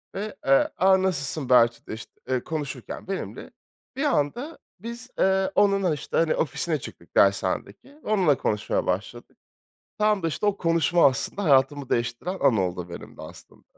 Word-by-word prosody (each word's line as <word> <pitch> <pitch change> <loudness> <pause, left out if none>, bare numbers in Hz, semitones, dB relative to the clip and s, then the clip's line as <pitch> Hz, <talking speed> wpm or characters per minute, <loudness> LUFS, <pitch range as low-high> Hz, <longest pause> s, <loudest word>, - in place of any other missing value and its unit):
Ve, 210 +2 -4
eee, 135 0 +4
"A! 190 0 +4
Nasılsın?" 145 -6 -2
bahçede, 120 -3 +3
işte, 110 - -9 0.2
eee, 130 -1 0
konuşurken 145 -2 -6
benimle, 195 -1 -5 0.4
bir 275 - -2
anda 270 - -1 0.2
biz, 235 +4 -8
eee, 190 0 +2
onunla, 195 -4 +3
işte, 145 - -4
hani, 165 -1 +2
ofisine 160 0 -1
çıktık 85 - -12
dershanedeki 100 - +1 0.2
ve - - -7
onunla 180 - +3
konuşmaya 105 0 -1
başladık. 105 +6 -4 0.6
Tam 210 -3 +2
da 165 - +1
işte 210 - -3
o 205 -1 +2
konuşma 170 0 +3
aslında 165 +9 -1
hayatımı 140 -1 +3
değiştiren 120 +11 -2
an 135 -5 +4
oldu 90 -2 -2
benim 85 - -10
de - - -10
aslında. - - -13
155 Hz, 155 wpm, -25 LUFS, 125-195 Hz, 0.6 s, eee